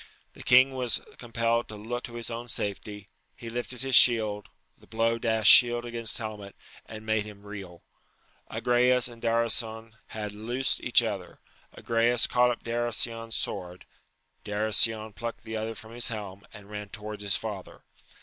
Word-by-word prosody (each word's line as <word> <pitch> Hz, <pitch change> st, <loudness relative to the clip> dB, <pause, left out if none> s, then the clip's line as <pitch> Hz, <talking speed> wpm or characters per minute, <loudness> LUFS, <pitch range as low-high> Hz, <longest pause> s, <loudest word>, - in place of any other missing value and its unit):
The -, -, -13 dB
king 130 Hz, +2 st, +5 dB
was 125 Hz, -3 st, 0 dB, 0.2 s
compelled 115 Hz, 0 st, -1 dB
to 110 Hz, -, -9 dB
look 120 Hz, +4 st, -5 dB
to 120 Hz, -, -9 dB
his 120 Hz, 0 st, -4 dB
own 120 Hz, +1 st, -6 dB
safety; 105 Hz, -1 st, -4 dB, 0.3 s
he 115 Hz, -, -9 dB
lifted 120 Hz, +2 st, -4 dB
his 135 Hz, -2 st, +1 dB
shield, 110 Hz, -5 st, +5 dB, 0.3 s
the -, -, -22 dB
blow 115 Hz, +1 st, 0 dB
dashed 110 Hz, -2 st, +4 dB
shield 120 Hz, -1 st, +6 dB
against 115 Hz, -2 st, -3 dB
helmet, 105 Hz, -3 st, -7 dB, 0.3 s
and 110 Hz, 0 st, -10 dB
made 110 Hz, -1 st, +1 dB
him 105 Hz, -1 st, -12 dB
reel. 95 Hz, -5 st, -10 dB, 0.7 s
Agrayes 125 Hz, 0 st, +2 dB
and 120 Hz, -1 st, -10 dB
Darasion 115 Hz, -1 st, -1 dB
had 105 Hz, -1 st, -5 dB
loosed 120 Hz, +6 st, -1 dB
each -, -, +3 dB
other: -, -, -5 dB, 0.4 s
Agrayes 115 Hz, +1 st, +2 dB
caught 125 Hz, 0 st, +3 dB
up 120 Hz, -, -4 dB
Darasion's 115 Hz, -1 st, -1 dB
sword; 90 Hz, 0 st, -4 dB, 0.6 s
Darasion 110 Hz, +1 st, +3 dB
plucked 115 Hz, +4 st, -6 dB
the 110 Hz, 0 st, -6 dB
other 110 Hz, +1 st, -4 dB
from 110 Hz, +1 st, -10 dB
his 120 Hz, 0 st, 0 dB
helm, 100 Hz, -3 st, -6 dB
and 105 Hz, -2 st, -13 dB
ran 105 Hz, -1 st, -7 dB
towards 105 Hz, 0 st, -7 dB
his 100 Hz, -1 st, +2 dB
father. 105 Hz, -4 st, -7 dB
115 Hz, 160 wpm, -27 LUFS, 105-120 Hz, 0.7 s, shield